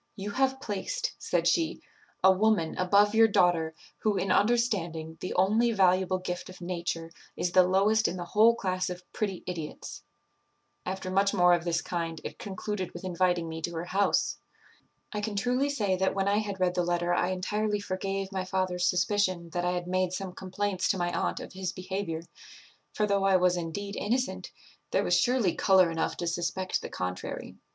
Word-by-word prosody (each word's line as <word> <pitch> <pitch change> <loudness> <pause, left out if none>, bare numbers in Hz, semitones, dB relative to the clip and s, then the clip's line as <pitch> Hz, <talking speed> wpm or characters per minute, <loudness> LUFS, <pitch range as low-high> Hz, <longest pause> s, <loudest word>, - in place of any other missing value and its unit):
'You 205 +1 -5
have 265 +3 +1
placed,' - - -3
said - - 0
she, 335 -1 +1 0.4
'a 190 - +8
woman 190 -4 +2
above 200 +3 +4
your 225 0 +6
daughter, 175 -6 +2 0.2
who, 210 -2 +1
in 190 - 0
understanding, 180 -9 +1
the 185 - -4
only 215 +6 +3
valuable 185 -1 +3
gift 180 -1 -5
of 185 - -11
nature, 170 -2 -4 0.3
is 175 - -1
the 185 - +7
lowest 210 +4 +3
in 185 - -3
the 175 - -5
whole 220 +5 +5
class 185 -4 -1
of 180 0 -6
pretty 200 -4 -3
idiots.' 165 -4 -6 0.9
After 185 0 -3
much 195 +2 +2
more 180 -1 +5
of 170 0 +1
this 170 0 0
kind, 165 -2 -3
it - - -7
concluded 195 -1 -4
with - - -8
inviting 180 -2 +1
me 160 0 -6
to 170 +2 -3
her 165 +1 -3
house. 195 +3 +1 0.7
"I 210 - -2
can 210 0 -3
truly 250 +7 +1
say 210 -9 0
that 190 +1 +1
when 195 0 0
I 205 +1 +3
had 200 -3 -4
read 180 -1 +2
the 180 - +1
letter 175 0 0
I 175 0 +1
entirely 210 +3 -1
forgave 195 0 -3
my 190 -1 -2
father's 185 -1 0
suspicion 180 -2 +1
that 175 +1 -1
I 180 - +1
had 175 -1 -3
made 185 0 0
some 190 -1 -4
complaints 190 0 -2
to 195 - +1
my 175 -1 0
aunt 85 0 -1
of - - -9
his 185 -1 -3
behaviour; 185 -3 -4 0.7
for, 210 - 0
though 200 -1 +1
I 195 -1 +4
was 180 0 +3
indeed 190 +4 -4
innocent, 250 +4 -1 0.4
there - - +1
was - - 0
surely 240 -8 +2
colour 185 -3 +4
enough 165 0 -2
to 175 - -3
suspect 175 +2 -1
the - - -6
contrary. 90 0 -5
185 Hz, 190 wpm, -29 LUFS, 175-205 Hz, 0.9 s, a